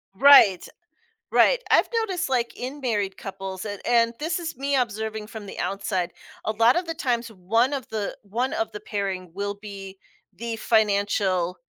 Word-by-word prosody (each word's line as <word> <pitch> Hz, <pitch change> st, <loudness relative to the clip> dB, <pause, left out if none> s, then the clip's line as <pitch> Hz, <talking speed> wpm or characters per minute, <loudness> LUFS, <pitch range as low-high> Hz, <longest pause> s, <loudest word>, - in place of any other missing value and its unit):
Right, 215 Hz, -8 st, +7 dB, 0.6 s
right. -, -, +5 dB
I've -, -, +5 dB
noticed, 370 Hz, -7 st, -2 dB
like, 245 Hz, -2 st, 0 dB
in 270 Hz, +3 st, -6 dB
married 205 Hz, -6 st, -1 dB
couples, 190 Hz, 0 st, -6 dB
and 205 Hz, -1 st, -5 dB
and 235 Hz, -1 st, +3 dB
this 320 Hz, +3 st, -1 dB
is 330 Hz, -2 st, -5 dB
me 280 Hz, +1 st, 0 dB
observing 220 Hz, -3 st, -2 dB
from 215 Hz, -2 st, -9 dB
the -, -, -9 dB
outside, 190 Hz, -2 st, -2 dB, 0.3 s
a 215 Hz, -, 0 dB
lot 230 Hz, +3 st, +4 dB
of 350 Hz, +1 st, 0 dB
the 330 Hz, -, -3 dB
times, 245 Hz, -7 st, -1 dB
one 225 Hz, +7 st, +1 dB
of 270 Hz, -4 st, -4 dB
the 215 Hz, -2 st, -3 dB
one 240 Hz, +7 st, -2 dB
of 335 Hz, 0 st, -2 dB
the 420 Hz, -, -6 dB
pairing 195 Hz, -, -4 dB
will 200 Hz, +2 st, -3 dB
be 200 Hz, -2 st, -9 dB, 0.4 s
the 230 Hz, 0 st, -5 dB
financial, 200 Hz, -5 st, +1 dB
220 Hz, 170 wpm, -25 LUFS, 200-255 Hz, 0.6 s, Right